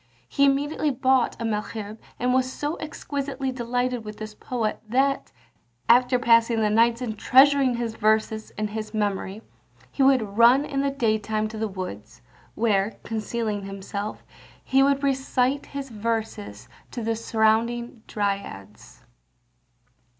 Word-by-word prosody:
He 280 - +2
immediately 290 +2 +1
bought 260 -1 +1
a 230 - -3
Malherbe, 215 0 -4 0.2
and 250 +1 +1
was 260 0 +1
so 295 +4 -3
exquisitely 280 -3 -4
delighted 245 -1 -2
with 210 0 -8
this 215 0 -7
poet 225 -1 -3
that, 270 +3 +1 0.6
after 250 +2 +5
passing 230 -1 +4
the 210 -1 +2
nights 230 +2 +3
in 220 -3 -3
treasuring 265 +2 +5
his 235 -1 -3
verses 220 0 0
in 215 0 -2
his 215 0 -6
memory, 205 0 -2 0.5
he - - -3
would 240 -6 +3
run 250 +5 +6
in 275 -2 -2
the 280 - +1
day 230 -6 +1
time 215 +1 -2
to 220 - -8
the 220 - 0
woods, 110 - -8 0.3
where, 210 -2 +1
concealing 215 -2 -3
himself, 200 +1 -6 0.4
he 265 +1 +3
would 280 0 +2
recite 265 0 0
his 280 -1 -6
verses 210 - -4 0.2
to 240 - -5
the 225 0 0
surrounding 230 +2 0
dryads. 195 - -5
230 Hz, 140 wpm, -25 LUFS, 215-260 Hz, 0.6 s, run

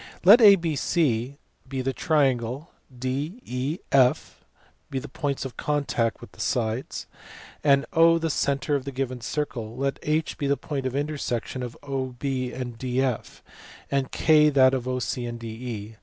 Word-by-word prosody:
Let 205 +7 +9
ABC 155 - +3 0.3
be 130 0 -3
the 135 +1 -1
triangle, 135 -2 0 0.2
J9, 130 - -3
E, 130 +6 -2
F 130 -2 +2 0.5
the 135 +1 -4
points 140 -1 -3
of 130 - -7
contact 140 -6 -1
of - - -12
the - - -20
sides, 115 +1 -2 0.6
and 140 -1 +4
the 165 0 +4
centre 140 +1 0
of 140 -2 0
the 140 - -4
given 130 -2 -3
circle. 120 -4 -4
Let 135 +1 -1
H 155 +1 -1
be 140 - -1
the 140 0 +2
point 140 -4 -3
of 130 - -4
inter 150 +2 -1
section 125 0 -3
of 120 -1 -6
OB 130 -3 -4
and 130 -3 -3
DF, 130 -1 -2 0.5
and 135 -2 0
K 150 -1 +5
that 130 -2 +5
of 130 -2 -2
OC 125 -3 -2
and 120 -1 -5
DE. 110 -2 -7
135 Hz, 155 wpm, -25 LUFS, 125-145 Hz, 0.6 s, Let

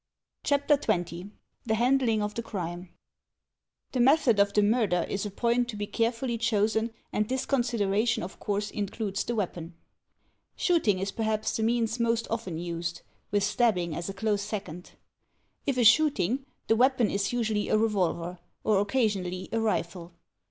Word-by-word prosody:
/ - - -60
CHAPTER 285 +1 +3
XX 175 -6 -2 0.4
THE 220 - +2
HANDLING 240 -2 +2
OF 210 0 -3
THE 235 - -3
CRIME 180 -5 -5 1.0
The 255 - -2
method 255 -3 +4
of 200 0 +4
the 210 0 +3
murder 205 -6 +2
is 200 +1 -2
a - - -5
point 235 +4 0
to 225 - -5
be 205 0 -3
carefully 230 +2 -1
chosen 220 0 +1 0.2
and 210 0 0
this 260 0 -1
consideration 230 -3 +1
of 185 - -8
course 205 0 -2
includes 200 -1 -3
the 240 - -3
weapon. 175 -5 -4 0.8
Shooting 320 - +2
is 195 +1 -2
perhaps 220 -1 -1
the - - -1
means 230 +1 +1
most 230 0 +1
often 220 -8 -3
used, 170 0 -4 0.3
with 205 -1 +1
stabbing 200 -6 +1
as 170 +3 -4
a - - -4
close 205 0 0
second. 195 -5 -6 0.7
If 275 -2 +1
a 245 - +3
shooting, 265 - +4 0.2
the 225 - +3
weapon 250 -1 +3
is 200 0 0
usually 220 -4 -1
a - - +4
revolver, 180 -5 0 0.2
or 210 -3 +3
occasionally 200 -5 -1
a 230 - 0
rifle. 175 -5 -2
215 Hz, 160 wpm, -28 LUFS, 195-235 Hz, 1.0 s, method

